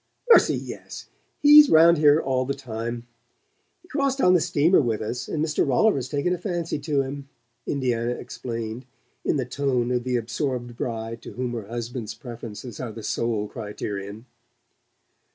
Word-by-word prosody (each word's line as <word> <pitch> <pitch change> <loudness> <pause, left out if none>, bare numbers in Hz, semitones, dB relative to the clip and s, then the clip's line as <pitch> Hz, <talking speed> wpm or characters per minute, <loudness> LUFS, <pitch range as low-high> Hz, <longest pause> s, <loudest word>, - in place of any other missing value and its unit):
"Mercy, - - +6
yes! - - -9 0.3
He's 295 0 +9
round 165 +1 +6
here 150 0 +6
all 130 -4 0
the 140 +2 -2
time. 120 -2 -5 0.8
He - - -20
crossed 275 -3 -1
on 180 -8 +5
the 180 - +4
steamer 155 +5 +3
with 115 -5 -1
us, 110 +3 -4
and 155 0 -1
Mr. 155 -2 +1
Rolliver's 135 - +2
taken 145 +5 0
a 180 - -3
fancy 175 -5 -3
to 145 -2 0
him," 140 +1 -7 0.4
Indiana 120 -3 0
explained, 115 0 -6 0.4
in - - +1
the 130 - -1
tone 125 -2 -1
of 125 -1 0
the 125 0 -1
absorbed 120 +1 -3
bride 115 -1 -4
to - - -10
whom 125 -1 -3
her 110 -4 -5
husband's 115 -1 -5
preferences 115 -1 -9
are 125 -3 -4
the 110 0 -9
sole 110 -2 -1
criterion. 105 -1 -6
125 Hz, 160 wpm, -24 LUFS, 115-145 Hz, 0.8 s, He's